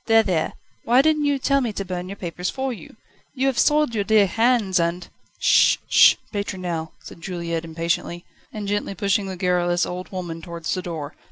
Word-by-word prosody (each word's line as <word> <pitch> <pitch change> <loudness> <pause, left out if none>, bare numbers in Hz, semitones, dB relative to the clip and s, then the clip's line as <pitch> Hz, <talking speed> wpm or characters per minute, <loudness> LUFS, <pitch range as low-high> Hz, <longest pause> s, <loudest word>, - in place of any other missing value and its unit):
There, 225 -1 +5
there! 175 -6 -1 0.3
why 245 +3 +4
didn't 305 -1 +2
you 285 -1 +2
tell 275 +1 +1
me 240 -4 -1
to 195 - -4
burn 180 0 -5
your 200 - -6
papers 180 -1 -4
for 265 -1 -3
you? 225 - -12 0.4
You 260 0 0
have 270 -3 +1
soiled 300 -4 +3
your 210 -2 0
dear 210 0 +4
hands, 225 -2 +2
and 170 +1 -1 0.2
..." - - -37
"Sh! - - +4
Sh! - - +7 0.2
Pétronelle!" 180 -5 -4
said - - -12
Juliette 170 -2 -4
impatiently, 170 +1 -3 0.3
and 210 -2 -6
gently 205 -1 -2
pushing 200 0 0
the 190 -1 -6
garrulous 175 -1 +1
old 180 +1 -6
woman 175 -3 -5
towards 170 0 -4
the 185 - -2
door. 165 -4 -6
185 Hz, 195 wpm, -22 LUFS, 175-225 Hz, 0.4 s, Sh